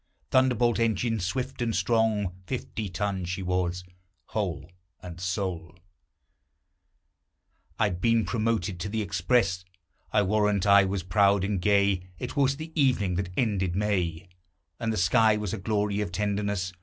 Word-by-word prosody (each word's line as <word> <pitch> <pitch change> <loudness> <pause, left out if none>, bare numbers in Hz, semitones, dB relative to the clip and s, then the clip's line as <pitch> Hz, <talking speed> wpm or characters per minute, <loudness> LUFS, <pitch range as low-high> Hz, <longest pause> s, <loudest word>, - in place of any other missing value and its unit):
Thunderbolt 125 -3 +3
engine, 115 0 +1
swift 130 +8 -3
and 115 -2 0
strong, 110 -5 +1
Fifty 115 -5 -4
tons 95 -1 -2
she 95 +1 -3
was, 90 -1 -1 0.5
whole 85 -7 -3 0.3
and 90 -1 -9
sole! 90 -2 -3 2.0
I - - +2
had 90 -4 -1
been 115 -1 +3
promoted 110 -5 -1
to 100 - -3
the 110 +1 -1
express: 95 0 +1 0.5
I 105 - +3
warrant 105 0 +1
I 100 -1 +6
was 95 -1 -2
proud 100 +2 +3
and 100 -2 -1
gay. 100 -1 +3 0.2
It - - -6
was 140 -1 +2
the 160 +1 -7
evening 125 - +2
that 95 -2 -2
ended 95 -7 0
May, 90 -4 -1 0.5
And 115 -1 -1
the 110 - -2
sky 105 +5 +4
was 105 -3 -3
a 110 - -3
glory 105 0 0
of 105 - -3
tenderness. 100 -1 -1
100 Hz, 145 wpm, -27 LUFS, 90-110 Hz, 2.0 s, I